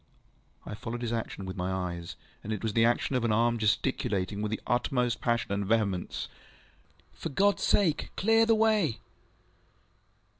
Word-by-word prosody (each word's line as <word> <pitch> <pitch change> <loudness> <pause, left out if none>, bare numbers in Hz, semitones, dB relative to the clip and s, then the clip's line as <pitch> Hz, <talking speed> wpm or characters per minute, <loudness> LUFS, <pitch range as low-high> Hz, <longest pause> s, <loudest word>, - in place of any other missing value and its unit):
ŌĆØ - - -7
I - - -4
followed 115 +2 -5
his 120 -1 -2
action 110 -4 -4
with 95 - -5
my 90 0 -2
eyes, 85 -2 -4 0.3
and 110 - -5
it 110 -1 -3
was 110 -2 -1
the 115 - +4
action 120 +3 +1
of 125 - +1
an 115 - +1
arm 115 +2 +2
gesticulating, 105 -3 0
with 105 - -1
the 110 - -2
utmost 120 -1 0
passion 120 -3 0
and 100 0 0
vehemence, 100 -3 -1 0.9
ŌĆ£For - - -5
GodŌĆÖs 200 +3 +3
sake, 175 -7 +2
clear 225 +3 +4
the 225 - +5
way! 215 - +2
115 Hz, 165 wpm, -29 LUFS, 100-125 Hz, 0.9 s, the